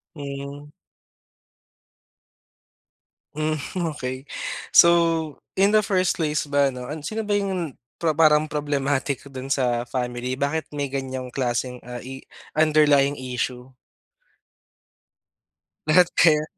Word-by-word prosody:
Hmm. 140 0 -7 2.7
Hmm 155 +1 -1 0.4
okey. 130 +2 -5 0.4
So, 170 - +8 0.7
in 200 +2 +4
the 215 - +6
first 185 -4 +1
place 150 -1 0
ba 140 -1 +2
'no, 125 -1 -7 0.2
sino 215 +8 -4
ba 205 - 0
yung, 190 -7 -1 0.2
parang 155 -2 +4
problematic 140 -2 -1
dun 130 0 -7
sa 125 -3 0
family, 125 0 -3
bakit 145 +3 -1
may 145 -1 -3
ganyang 130 -2 -4
klaseng, 125 -1 -2
ah, 125 0 -8
i 130 +1 -8 0.3
underlying 150 -2 +4
issue? 125 0 -4 2.1
Lahat 175 +3 +6
kayo? 155 -2 +5
140 Hz, 100 wpm, -24 LUFS, 130-155 Hz, 2.7 s, So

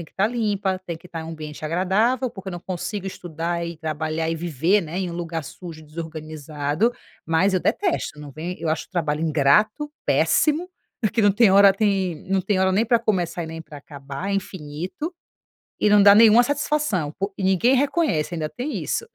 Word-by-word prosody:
tá 195 - +2
limpa, 205 -5 -1
tem 170 -3 -5
que 170 - -16
tá 170 -2 -6
em - - -7
um 160 - -7
ambiente 155 -2 -8
agradável, 205 +10 +1
porque, 190 -3 -8
eu - - -7
não 175 - -6
consigo 190 +3 -5
estudar, 170 -2 -4
e 170 -1 -6
trabalhar, 155 0 -2
e 165 - -1
viver, 170 +4 +1
né, 165 +1 -6
em 185 -2 -2
um - - -6
lugar 165 -2 -4
sujo, 160 +2 -10
desorganizado, 155 - -3 0.3
mas 165 +5 +2
eu 185 - +2
detesto." 345 - -1
Não 145 -1 -9
vem 165 +6 -5
eu 160 - -2
acho 160 - -2
o - - -53
trabalho 155 -4 -1
ingrato, 165 - +2
péssimo, 320 +4 +2 0.3
porque 225 0 +1
não 205 -1 +5
tem 210 0 +4
hora, 200 0 +7
tem 195 -5 0
não 195 -1 +2
tem 190 +1 0
hora 190 0 +3
nem 205 +5 +2
pra 235 +1 +3
começar, 180 -6 -1
e - - -6
nem 165 0 -7
pra 155 -2 -12
acabar, 140 +4 -7
é - - 0
infinito 185 - -5 0.7
e 210 - +3
não 205 -1 +6
dá 200 0 +9
nenhuma 225 +2 +7
satisfação, 285 - 0
pô 195 +1 -3
e 195 - -4
ninguém 190 +7 +3
reconhece, 275 - +1
ainda 155 -2 -2
tem 260 - -4
isso, - - -2
180 Hz, 200 wpm, -23 LUFS, 160-210 Hz, 0.7 s, dá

